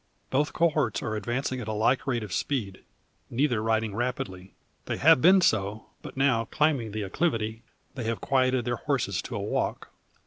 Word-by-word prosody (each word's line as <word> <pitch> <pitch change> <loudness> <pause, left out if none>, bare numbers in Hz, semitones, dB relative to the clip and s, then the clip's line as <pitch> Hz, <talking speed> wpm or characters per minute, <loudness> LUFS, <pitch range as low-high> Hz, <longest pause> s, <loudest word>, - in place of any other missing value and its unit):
Both 145 +3 +1
cohorts 155 -8 +1
are 110 - -2
advancing 125 +5 -2
at 110 - -7
a 110 - -2
like 115 +6 +1
rate 120 -4 0
of 100 -4 -6
speed, 105 -9 -2 0.5
neither 125 -3 +1
riding 110 -1 0
rapidly. 115 -6 -4 0.3
They - - -2
have - - +6
been 185 +4 +7
so, 105 - 0
but - - -10
now, 130 -4 +2
climbing 140 -5 0
the 105 0 -3
acclivity, 110 - -1 0.3
they 125 -4 -5
have 115 0 -1
quieted 130 -2 +1
their 120 -1 -1
horses - - -1
to - - -7
a - - -2
walk. - - -2
120 Hz, 175 wpm, -27 LUFS, 110-135 Hz, 0.5 s, been